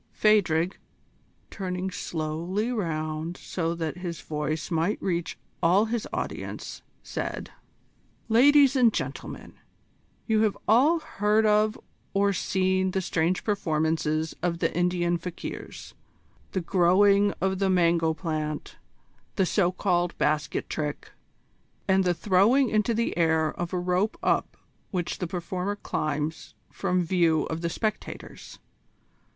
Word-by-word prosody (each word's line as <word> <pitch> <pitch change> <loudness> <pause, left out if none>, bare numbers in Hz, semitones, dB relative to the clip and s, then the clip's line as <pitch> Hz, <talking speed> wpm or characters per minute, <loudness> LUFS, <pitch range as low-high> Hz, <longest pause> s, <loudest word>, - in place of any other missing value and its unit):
Phadrig, 185 -5 +2 0.7
turning 185 -1 -3
slowly 170 +7 -2
round 160 -5 -3
so 170 -2 -3
that 165 0 -3
his 175 -3 -5
voice 155 +2 -3
might 165 +5 0
reach 170 -3 -2 0.2
all 180 +5 +4
his 225 0 -2
audience, - - -5 0.2
said: - - -5 0.8
"Ladies 275 +4 +6
and 245 -4 +5
gentlemen, - - -5 0.7
you 220 -2 +2
have 215 -2 +1
all 270 +10 +5
heard 215 -7 +1
of 215 0 +3 0.4
or 200 0 +3
seen 185 0 +1
the 190 - -1
strange 175 0 0
performances 160 -5 0
of 175 -1 0
the - - -1
Indian 175 -1 +1
fakirs: 175 0 -7 0.6
the 190 - 0
growing 200 +3 +4
of 190 +1 0
the 195 -1 +2
mango 170 -3 +3
plant, 155 -2 -4 0.6
the 195 - +2
so 180 -1 +2
called 180 -2 0
basket 150 -1 0
trick, 150 -2 -4 0.8
and 190 0 +4
the 175 -1 +2
throwing 215 +9 +3
into 215 +2 +2
the 230 +1 0
air 160 -2 +2
of 175 0 -4
a 185 - -1
rope 180 +4 0
up - - +1 0.3
which 180 -4 -3
the 180 - -2
performer 180 +3 -3
climbs 155 -4 -3 0.2
from 180 -2 0
view 165 -3 +2
of 160 +1 -4
the 170 - -1
spectators. 215 +5 -5
180 Hz, 125 wpm, -26 LUFS, 165-205 Hz, 0.8 s, Ladies